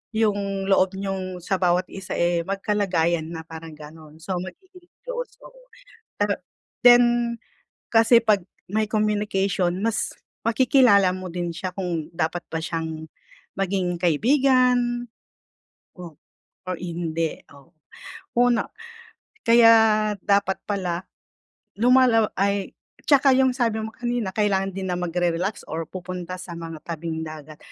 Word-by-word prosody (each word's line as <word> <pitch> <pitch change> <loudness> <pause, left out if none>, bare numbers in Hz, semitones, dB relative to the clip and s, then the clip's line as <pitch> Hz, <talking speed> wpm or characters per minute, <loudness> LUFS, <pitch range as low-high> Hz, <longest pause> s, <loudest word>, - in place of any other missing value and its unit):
yung 200 -3 0
loob 190 -1 +2
niyong 190 -2 -4
sa 190 0 -1
bawat 180 +1 +2
isa 190 0 -6
eh, 170 0 +1
magkalagayan 185 -5 0
na 160 -1 -7
parang 160 -1 -10
ganon, 155 0 -13
so 170 +4 -5
magiging 365 - -12 0.2
close, - - -5
oo. - - -16 0.5
Pero, 205 -1 0 0.5
then, 240 -1 +5 0.5
kasi 230 +1 +6
'pag 210 -5 +2 0.3
may 215 +1 +1
communication 200 -4 0
mas, 225 0 -1 0.3
makikilala 230 -5 +4
mo 185 -2 -7
din 175 -1 -2
siya 185 0 -4
kung 175 -4 -4
dapat 165 +1 -2
ba 160 - -2
siyang 160 -1 -4 0.5
maging 190 -2 -1
kaibigan, 245 - +2 0.9
o 170 -4 -10 0.5
or 185 - -2
hindi, 165 -2 -3
oh. 140 +5 -18 0.7
Una, 245 -3 +3 0.8
kaya 230 0 +7 0.5
dapat 200 -1 +1
pala, 185 -3 -2 0.7
lumalala 245 -3 +4
ay 200 0 0 0.4
tsaka 275 -2 +5
yung 260 0 +4
sabi 230 -4 0
mo 220 - -4
kanina 240 -4 -2
kailangan 195 -2 +1
din 190 - -3
na - - 0
mag-re-relax 175 +2 -1
or 160 +1 -3
pupunta 185 -1 -6
sa 175 -1 -8
mga 165 -2 -7
tabing 160 -1 -4
dagat. 155 -1 -10
195 Hz, 125 wpm, -23 LUFS, 170-225 Hz, 0.9 s, kaya